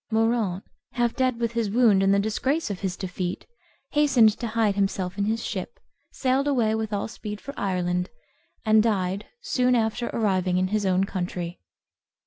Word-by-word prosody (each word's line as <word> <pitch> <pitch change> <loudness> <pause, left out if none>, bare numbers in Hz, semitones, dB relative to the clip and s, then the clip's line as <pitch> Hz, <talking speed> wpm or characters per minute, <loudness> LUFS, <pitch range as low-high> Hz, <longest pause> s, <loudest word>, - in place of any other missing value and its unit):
Moraunt, 220 -4 +1 0.3
half 240 -1 0
dead 255 -3 +1
with 230 -1 0
his 230 -3 -1
wound 215 -3 +4
and 195 0 +3
the 200 - +4
disgrace 220 +7 0
of 190 - -5
his 185 -3 -3
defeat, 180 -1 -4 0.5
hastened 270 -7 +5
to 235 - -2
hide 220 -2 +1
himself 195 -2 -1
in 200 0 0
his 225 +2 -1
ship, - - -5 0.3
sailed 265 +2 +1
away 240 -6 +2
with 220 -1 -2
all 205 - -1
speed 210 -2 -7
for 280 - -8
Ireland, 180 -3 -1 0.6
and 215 0 +5
died 200 -3 0
soon 250 - +2
after 230 +1 0
arriving 185 -4 +1
in 185 0 +1
his 210 -1 0
own 185 0 +3
country. 180 -2 -4
215 Hz, 170 wpm, -25 LUFS, 190-235 Hz, 0.6 s, hastened